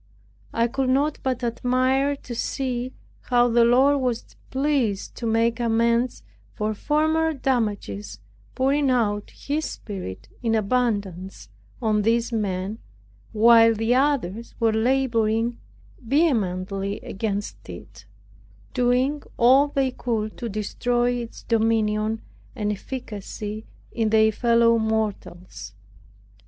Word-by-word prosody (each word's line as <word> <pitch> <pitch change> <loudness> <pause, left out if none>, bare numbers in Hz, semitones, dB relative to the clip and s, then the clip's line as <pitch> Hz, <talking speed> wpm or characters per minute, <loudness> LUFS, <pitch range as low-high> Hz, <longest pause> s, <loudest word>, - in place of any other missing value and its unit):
I 230 - +1
could 260 +2 -1
not 285 +3 +1
but 255 -2 -2
admire 255 +4 +1
to 250 -3 -9
see 250 +1 -2 0.3
how 245 -1 +3
the 235 0 +4
Lord 265 +4 +4
was 245 -3 -3
pleased 260 -7 0
to 235 - -3
make 230 +1 +1
amends 235 - +1 0.3
for 215 +1 -1
former 315 +6 +1
damages, 205 - -2 0.4
pouring 275 +2 +2
out 210 -5 0
His 300 +2 -3
Spirit 110 - -7
in 225 -2 +1
abundance 200 - -1 0.3
on 215 -1 +2
these 230 +3 +1
men, 200 0 -2 0.5
while 230 +1 +6
the 225 +2 +1
others 250 -6 0
were 225 -1 +2
laboring 230 -1 +1 0.4
vehemently 200 - 0
against 205 - -4
it, 90 +3 -11 0.7
doing 250 +4 +1 0.2
all 260 +4 +6
they 275 -2 0
could 220 -4 -3
to 235 - -4
destroy 240 +4 0
its 240 -2 -5
dominion 220 -1 +1 0.3
and 210 -1 -1
efficacy 210 -1 -6 0.2
in 225 -2 0
their 220 0 +4
fellow 230 +1 +3
mortals. 190 - -3
230 Hz, 110 wpm, -24 LUFS, 210-255 Hz, 0.7 s, while